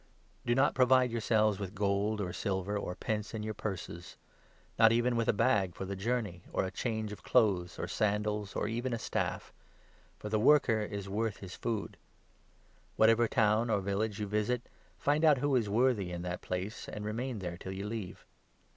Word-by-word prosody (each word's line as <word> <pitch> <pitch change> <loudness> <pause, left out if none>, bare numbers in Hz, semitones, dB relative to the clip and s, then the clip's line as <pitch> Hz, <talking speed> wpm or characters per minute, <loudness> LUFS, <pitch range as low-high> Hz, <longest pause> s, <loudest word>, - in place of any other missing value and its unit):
Do 120 - +3
not 135 - +3
provide 130 -1 +4
yourselves 110 -3 +2
with 100 0 -5
gold, 100 +1 0
or 90 -2 -3
silver, 95 0 -2
g 100 - -1
or 90 - -4
pence 110 +1 -3
in 105 - -4
your 110 0 -3
purses; 90 -5 -6 0.6
not 115 -1 +7
even 120 +1 +2
with 115 -1 0
a - - +6
bag 105 -5 +2
for 95 - -5
the 100 +1 -4
journey, 105 -3 -2
10 - - -18
or - - +1
a 95 - -4
change 110 -3 -2
of 105 - -8
clothes, 100 -8 +2
or - - -3
sandals, 105 -1 -1
or - - 0
even 120 +3 -2
a - - 0
staff; - - -3 0.6
for - - -7
the 110 0 +1
worker 125 -2 +5
is 100 -2 -4
worth 105 +1 -1
his 95 -2 -9
food. 110 -4 -3 1.0
Whatever 115 +1 +5
town 110 +2 +2
or 105 - +2
village 100 +2 -1
you 105 - -2
u - - -9
visit, 105 +3 0 0.3
find 145 +2 +1
out 155 -3 +6
who 140 +1 +1
is 115 -5 +1
worthy 110 -4 +2
in 85 0 -5
that 90 0 -4
place, 90 +4 -4
and 105 0 -6
remain 120 +3 -3
there 90 -3 -4
till 95 - -6
you 95 +1 -5
leave. 105 -4 -6
105 Hz, 200 wpm, -32 LUFS, 100-115 Hz, 1.0 s, not